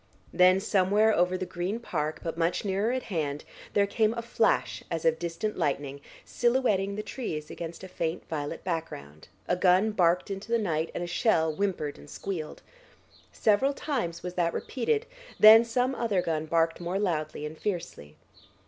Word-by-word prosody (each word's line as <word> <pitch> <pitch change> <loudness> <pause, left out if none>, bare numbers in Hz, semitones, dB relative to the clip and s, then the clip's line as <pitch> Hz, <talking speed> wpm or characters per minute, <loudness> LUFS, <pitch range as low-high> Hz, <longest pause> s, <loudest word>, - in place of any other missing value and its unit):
Then 185 +1 +5
somewhere 205 +2 +3
over 180 +1 +2
the 185 - -3
Green 180 +6 -3
Park, 155 -8 -3
but 165 -1 -3
much 170 +4 0
nearer 200 +4 0
at 255 0 -2
hand, 150 -6 -3 0.3
there 200 - +4
came 215 +2 +1
a 235 - -4
flash 225 -1 +1
as 165 -1 -3
of 160 0 +3
distant 175 +5 -3
lightning, 140 0 -2 0.2
silhouetting 235 -6 +1
the 210 - -4
trees 155 - -5
against 170 +1 -7
a - - -6
faint 165 -2 -4
violet 150 0 -4
background, 120 - -5 0.2
a 180 - +2
gun 185 +4 +3
barked 180 -1 +2
into 195 +3 -6
the 235 - +4
night, 165 -7 -1
and 175 - -2
a - - -2
shell 165 -3 +1
whimpered 165 -5 -2
and - - -14
squealed. 165 -4 -6 0.7
Several 260 +7 +2
times 175 - -3
was 180 0 -5
that 170 -2 0
repeated, 430 - -1 0.3
then 220 +2 +10
some 250 +3 0
other 220 -8 0
gun 160 -1 -2
barked 165 +1 +1
more 175 +2 -2
loudly 155 -6 -2
and 150 +1 -6
fiercely. 170 - -5
180 Hz, 170 wpm, -28 LUFS, 165-215 Hz, 0.7 s, then